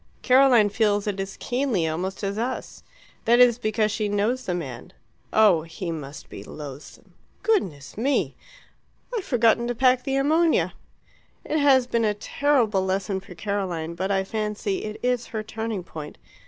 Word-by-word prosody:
"Caroline 250 -5 +6
feels 205 -1 +1
it 200 -2 -2
as 195 0 -5
keenly 245 -10 0
almost 185 +6 -3
as 200 0 -1
us. 250 +3 -4 0.4
That 235 +2 +5
is 245 -1 +6
because 215 -1 +1
she 210 0 -1
knows 215 +6 0
the 180 - 0
man. 130 -8 -7 0.4
Oh, 205 -7 +5
he 165 +2 -6
must 150 -2 -7
be - - -9
loathsome! 145 -1 -10 0.3
Goodness 180 - 0
me! 270 +4 +1 0.8
I've 430 - -2
forgotten 235 -3 +2
to 245 - -2
pack 255 +1 +4
the 270 - -1
ammonia!... 315 +4 +2 0.7
It 310 - 0
has 270 -3 +5
been 235 -2 0
a 210 -1 +1
terrible 225 -4 +1
lesson 190 +1 -1
for 195 - -13
Caroline, 185 -6 -3
but 185 +3 -3
I 195 -1 +1
fancy 210 -1 -3
it 215 0 -6
is 250 -1 0
her 220 -1 -4
turning 220 -3 -4
point. 155 -3 -9
215 Hz, 160 wpm, -25 LUFS, 190-245 Hz, 0.8 s, Caroline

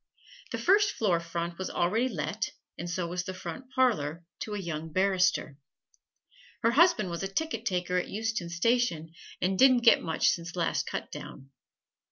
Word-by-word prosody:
The - - -2
first 405 +1 +4
floor 185 -6 +1
front 170 +1 -4
was 190 - -3
already 215 +9 +1
let, 155 - -3 0.2
and 175 +2 -6
so 175 +1 -2
was 180 +1 -3
the 185 0 -6
front 185 +8 -7
parlor 170 - +1 0.2
to 210 - -4
a - - -3
young 160 -3 -5
barrister. 185 -5 +1 1.1
Her 230 - +4
husband 315 - +4
was 170 - -4
a 195 - -1
ticket 245 +3 -2
taker 180 -2 0
at - - -5
Euston 220 -4 -2
Station, 170 -4 0 0.3
and 185 +1 +1
didn't 255 -2 +6
get 230 - +6
much 160 -2 +2
since 170 +1 -2
last 170 -2 0
cutdown. 135 +1 -7
185 Hz, 165 wpm, -29 LUFS, 170-230 Hz, 1.1 s, didn't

